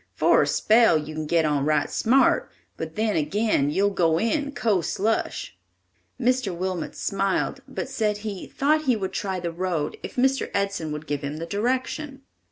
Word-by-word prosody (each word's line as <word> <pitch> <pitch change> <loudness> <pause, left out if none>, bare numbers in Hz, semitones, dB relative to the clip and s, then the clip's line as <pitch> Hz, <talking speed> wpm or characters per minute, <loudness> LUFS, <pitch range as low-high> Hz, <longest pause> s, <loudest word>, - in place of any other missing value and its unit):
For - - +4
a - - +1
spell 225 -5 +4
you 155 0 -5
can 155 0 -4
get 165 0 +2
on 145 -2 +1
right 150 +1 +2
smart, 260 +4 +3 0.3
but 160 0 -6
then, 215 -1 0
again, 165 -2 +1
you'll 200 +6 +2
go 165 -4 +2
in 280 - 0
co 215 -9 +1
slush!" 220 +6 -2 0.6
Mr. 250 -6 +1
Wilmot 185 -2 -3
smiled, 195 +7 -1
but 270 - -4
said 220 -6 -1
he 200 -3 -5
"thought 305 +2 +1
he 255 -3 +3
would 190 -3 -4
try 190 -2 -2
the 170 -1 -3
road 170 -3 -2
if - - -8
Mr. 265 +2 +1
Edson 200 -6 -1
would 150 +1 -5
give 145 -2 -3
him 145 +1 -4
the 165 - -4
direction." 260 - -2
195 Hz, 175 wpm, -25 LUFS, 160-240 Hz, 0.6 s, For